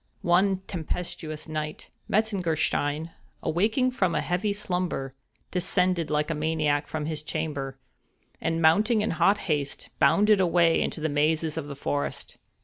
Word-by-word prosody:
One 185 +2 +3
tempestuous 160 -3 -5
night, 155 -1 -5 0.2
Metzengerstein, 165 -6 0 0.3
awaking 220 - +1
from 185 -9 0
a - - +1
heavy 180 +5 0
slumber, 180 -9 -2 0.4
descended 180 -2 +1
like 150 +1 0
a - - +1
maniac 150 -1 0
from 155 -1 -3
his 155 -1 -3
chamber, 150 -4 -3 0.6
and, 165 0 0
mounting 210 +8 +4
in 215 - 0
hot 195 +5 +3
haste, 145 -5 -2
bounded 205 +8 +5
away 170 -2 +4
into - - -2
the 160 - +1
mazes 155 +1 +1
of 160 -3 -4
the 140 - -6
forest. 145 +1 -3
165 Hz, 140 wpm, -27 LUFS, 150-185 Hz, 0.6 s, bounded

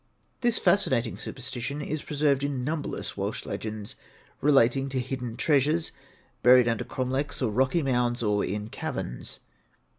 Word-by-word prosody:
This 240 -2 +2
fascinating 130 - +2
superstition 130 +2 -5
is 150 0 -3
preserved 145 -2 +1
in 140 -3 -1
numberless 150 +2 -3
Welsh - - -3
legends 110 -1 -5 0.5
relating 135 -1 +4
to 130 -1 -1
hidden 125 -2 -4
treasures, 155 +2 +2 0.5
buried 125 0 +7
under 115 -2 0
cromlechs 130 +3 -2
or 125 -5 0
rocky 130 +8 +2
mounds, 120 -2 +1
or 105 -1 +2
in 105 +2 -3
caverns. - - -5
130 Hz, 130 wpm, -27 LUFS, 120-145 Hz, 0.5 s, buried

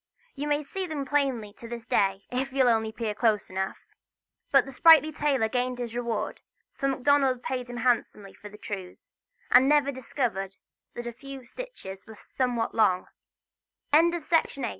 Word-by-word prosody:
You 290 +1 -4
may 295 0 +1
see 370 +6 -5
them 295 -4 -4
plainly 265 -7 0
to 230 - -9
this 235 -1 -7
day, 195 -2 +1
if 260 +2 -2
you'll 260 -2 +3
only 220 -1 +1
peer 220 -1 -3
close 215 -3 +1
enough. 190 +1 -3 0.7
But 275 -2 +5
the 270 - -8
sprightly 310 +2 +6
tailor 285 -6 +1
gained 250 +2 -1
his 240 -2 -5
reward: 235 -3 -3 0.3
for 275 - -2
Macdonald 270 -1 +2
paid 250 -2 -3
him 245 - -6
handsomely 225 -5 0
for 210 - -12
the 210 - -13
trews, 195 -4 -8 0.4
and 255 +2 +7
never 290 -2 +3
discovered 230 -7 -3 0.4
that 240 - -6
a 240 - -5
few 275 +3 -9
of - - -18
the 240 - -20
stitches 195 - -9
were 220 - -11
somewhat 240 +1 -2
long. 190 -5 +2
245 Hz, 165 wpm, -27 LUFS, 220-275 Hz, 0.7 s, and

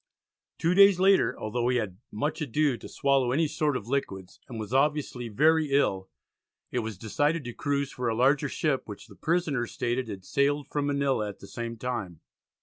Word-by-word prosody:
Two 165 +2 +1
days 195 -1 +7
later, 195 +1 +3
although 120 +3 -1
he 125 0 +2
had 95 -6 -3
"much 145 +9 -2
ado 145 0 +1
to - - -10
swallow 135 -3 +1
any 155 +5 +2
sort 150 -2 0
of 105 - -9
liquids," 95 -9 -3
and 115 -3 -6
was 110 +2 -6
obviously 135 -3 +1
very 155 +6 +3
ill, 95 -9 +1 0.6
it 125 - 0
was 110 -4 -4
decided 145 - 0
to 120 -1 -6
cruise 140 +1 -1
for 125 -2 -2
a 110 - -1
larger 140 +4 +3
ship 140 -2 -1
which 105 -1 -9
the 105 -3 -16
prisoners 150 - -1
stated 120 +1 -1
had 95 -4 -7
sailed 145 +1 +1
from 145 -1 -2
Manila 140 -7 0
at 100 - -9
the - - -12
same 115 +2 -6
time. 110 -9 -4
130 Hz, 190 wpm, -27 LUFS, 110-145 Hz, 0.6 s, days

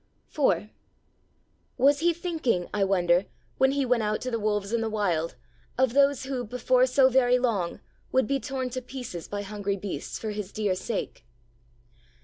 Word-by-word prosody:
IV 210 - +1 1.1
Was 280 +2 +4
He 345 +2 +3
thinking, 320 - -1
I 205 -1 +1
wonder, 180 -1 +2 0.3
when 265 +1 +4
He 280 -1 +1
went 250 -2 +2
out 215 0 0
to 255 - -3
the 230 - -1
wolves 210 0 -1
in 235 - +1
the 225 - -1
Wild 175 -8 -1 0.4
of 260 -2 +2
those 280 -1 +3
who, 265 -2 -3
before 250 +2 +2
so 260 +1 +5
very 250 -1 +4
long, 215 -9 -1 0.3
would 260 -2 +3
be 275 +4 0
torn 260 -1 -3
to 255 +1 -3
pieces 245 -9 -7
by 205 0 -4
hungry 200 -1 -3
beasts 195 0 -5
for 220 - -4
His 210 -2 -5
dear 210 -3 0
sake? 190 - -4
235 Hz, 170 wpm, -27 LUFS, 205-260 Hz, 1.1 s, so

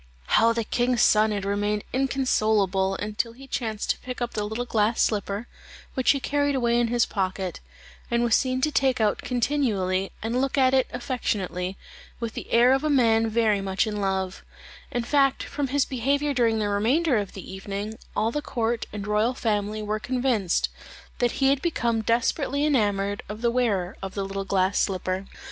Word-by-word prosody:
How 230 +1 +5
the 230 0 -1
king's 245 +2 +1
son 215 +1 +5
had 200 -2 -2
remained 205 +1 0
inconsolable 215 -8 +1
until 215 +3 -2
he 270 +3 -13
chanced 220 -5 -2
to - - -4
pick 250 -1 -6
up 240 -1 -3
the 210 -1 -2
little 220 +4 -3
glass 220 -1 +1
slipper, 205 +1 0 0.5
which 260 -2 0
he 280 - +5
carried 285 +1 0
away 240 -2 +2
in 240 - +2
his 240 0 +2
pocket, 190 -2 -3 0.5
and 235 0 +1
was 235 -2 +4
seen 255 -1 0
to 305 +2 +2
take 265 -3 +2
it - - +3
out 210 - +1
continually, 220 -8 0
and 235 +3 0
look 270 +1 -1
at 260 -1 +4
it 260 -1 +3
affectionately, 190 -7 -3 0.4
with 230 -2 -4
the - - -7
air 240 +2 +6
of 270 +2 +1
a 305 - +1
man 225 -5 +3
very 220 -3 +2
much 190 +1 0
in 215 -1 -3
love; 190 -1 -2 0.5
in 240 - -2
fact, 275 +1 +2
from 285 -1 -3
his 280 +1 +1
behaviour 280 +3 0
during 230 -3 +2
the 210 -1 0
remainder 245 +8 +2
of 200 -2 -3
the 190 -1 -9
evening, 200 +2 -5 0.2
all 220 +2 +1
the 295 - -2
court 235 -4 -2
and 205 -1 -5
royal 210 +4 +1
family 215 -1 -1
were 210 +1 -2
convinced 245 -6 0 0.5
that 245 -1 +2
he 270 - +2
had 275 -1 +2
become 235 -9 0
desperately 260 +6 +1
enamoured 205 -7 +1
of 215 +2 -7
the 235 - +3
wearer 205 -7 0
of 195 -1 -6
the 200 - -1
little 195 0 -4
glass 195 0 +1
slipper. 185 0 -1
225 Hz, 190 wpm, -25 LUFS, 205-255 Hz, 0.5 s, air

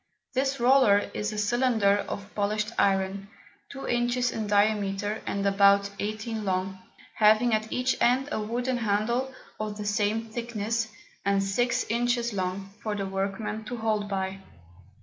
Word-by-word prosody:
This 270 0 0
Roller 240 -5 +4
is 210 0 -2
a 215 - -5
Cylinder 220 -2 +2
of 200 0 -6
polish'd 210 +1 -1
Iron, 195 0 +1 0.4
two 270 -1 -7
Inches 240 0 +1
in 220 -2 -3
diameter, 205 0 +1
and 200 0 -1
about 200 0 +4
eighteen 215 +1 -3
long, 190 0 -2 0.3
having 220 +2 +4
at 215 0 0
each 250 +1 0
End 255 +3 +3
a 220 - -1
wooden 245 +4 -1
Handle 235 +4 0 0.3
of 210 -1 -4
the 210 - -5
same 210 +2 0
Thickness, 225 -1 -2 0.4
and 200 0 +2
six 240 +5 +1
Inches 240 0 0
long, 190 0 -3
for 215 -1 -2
the 200 -1 -2
Workman 195 +3 -3
to 245 +2 -5
hold 215 -2 -1
by. 190 0 -2
215 Hz, 150 wpm, -27 LUFS, 200-235 Hz, 0.4 s, Roller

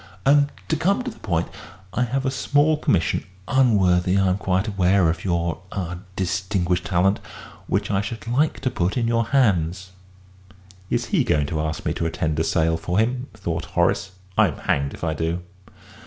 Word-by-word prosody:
And, 145 +1 +4 0.2
to 160 - +1
come 195 - +1
to 250 - -4
the 220 - -16
point, 85 -4 -1 0.5
I 125 - +1
have 130 +3 -2
a 130 - +1
small 145 +3 +2
commission 95 - +1 0.2
unworthy, 95 -8 +3
I 95 -1 +3
am 90 +2 0
quite 95 +2 0
aware, 95 -3 +3
of 80 - -6
your 85 -2 -1
ah 90 -3 -4 0.2
distinguished 90 -1 -1
talent 95 +1 +2 0.5
which - - 0
I 100 -1 +2
should 105 0 -6
like 140 +6 +1
to 130 -1 0
put 95 -2 -1
in 115 -2 +1
your 115 0 +2
hands." 95 - +1 1.0
"Is - - 0
he - - +4
going 75 -1 +1
to 75 +2 -2
ask 80 -1 -3
me - - +1
to 80 - -1
attend 80 -1 -1
a - - +2
sale 80 0 +1
for 90 +2 -2
him?" 125 +4 +1
thought 85 -6 -3
Horace. 95 - +1 0.3
"I'm - - +3
hanged 70 0 -1
if - - -13
I 80 -2 0
do." 80 +3 -2
95 Hz, 185 wpm, -23 LUFS, 85-120 Hz, 1.0 s, And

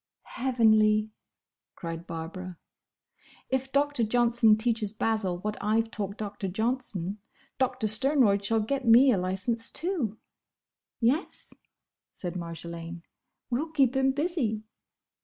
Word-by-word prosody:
"Heavenly!" 220 -4 +3 0.6
cried 165 0 -6
Barbara. 175 +2 -6 0.9
"If 265 0 -1
Doctor 285 -3 +1
Johnson 235 -1 +4
teaches 220 -2 0
Basil 215 -5 0
what 210 +4 -4
I 215 +2 +2
've 225 0 -9
taught 200 -1 -4
Doctor 205 -2 -4
Johnson, 210 -2 -2 0.4
Doctor 260 -3 0
Sternroyd 220 -3 +3
shall 225 +2 +2
get 270 +5 -2
me 250 +4 +7
a 215 - +2
licence, 195 +6 -2
too." 310 - -2 0.8
"Yes," 255 +9 -1 0.6
said 175 -2 -5
Marjolaine, 170 0 -7 0.5
"we'll 285 +7 -1
keep 275 -5 +2
him 265 0 +3
busy." 275 -8 -1
220 Hz, 115 wpm, -28 LUFS, 195-255 Hz, 0.9 s, me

